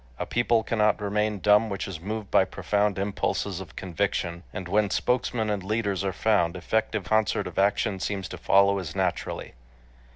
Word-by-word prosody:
A - - -3
people 120 -1 +2
cannot 105 -2 +2
remain 105 +1 0
dumb 105 +3 +4
which 100 0 -3
is 95 -5 -6
moved 105 +3 -5
by - - +5
profound 100 +2 0
impulses 100 -1 -1
of 85 -5 -11
conviction; 90 -2 -2
and 95 -1 -6
when 105 +2 +2
spokesmen 115 +2 0
and 100 -2 -1
leaders 100 -1 -1
are 95 - 0
found, 95 -3 +1
effective 105 +3 -1
concert 110 +2 +1
of - - -4
action 100 0 +1
seems 95 -1 -3
to 90 - -7
follow 100 +2 +4
as 85 -4 -6
naturally. - - -2
100 Hz, 170 wpm, -26 LUFS, 95-105 Hz, -, by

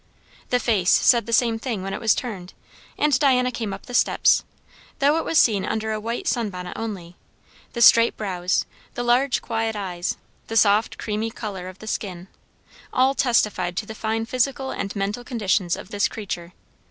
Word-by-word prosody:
The 250 - +3
face 205 -8 +1
said 235 -2 +4
the - - -4
same 230 -1 +2
thing 225 -6 -3
when 195 0 -4
it - - -4
was 220 -2 +3
turned, 195 -8 -6 0.4
and 295 -4 +2
Diana 255 -3 +3
came 225 -4 -4
up 195 - -8
the 245 - -10
steps; - - +3 0.5
though 285 +3 +3
it 325 - -1
was 325 - +1
seen 205 -8 +4
under 220 +2 -2
a 215 - -2
white 230 +3 -4
sun 230 -3 0
bonnet 180 -2 -7
only; 195 -6 -6 0.6
the 235 - +2
straight 230 0 +6
brows, 185 -3 -1 0.3
the 245 - -2
large 245 +1 +2
quiet 225 -1 -2
eyes, 180 -3 -3 0.3
the 225 - -2
soft 210 +1 +3
creamy 215 +1 -2
colour 200 -5 -6
of 185 0 -10
the 220 - -12
skin, 190 -4 -5 0.6
all 260 +1 +3
testified 210 -9 +1
to 220 - -1
the 220 - -7
fine 225 +1 -2
physical 265 +2 -1
and 200 - -4
mental 205 +4 -2
conditions 205 -8 0
of - - -10
this 205 -2 +1
creature. 180 -5 -6
220 Hz, 185 wpm, -23 LUFS, 195-240 Hz, 0.6 s, straight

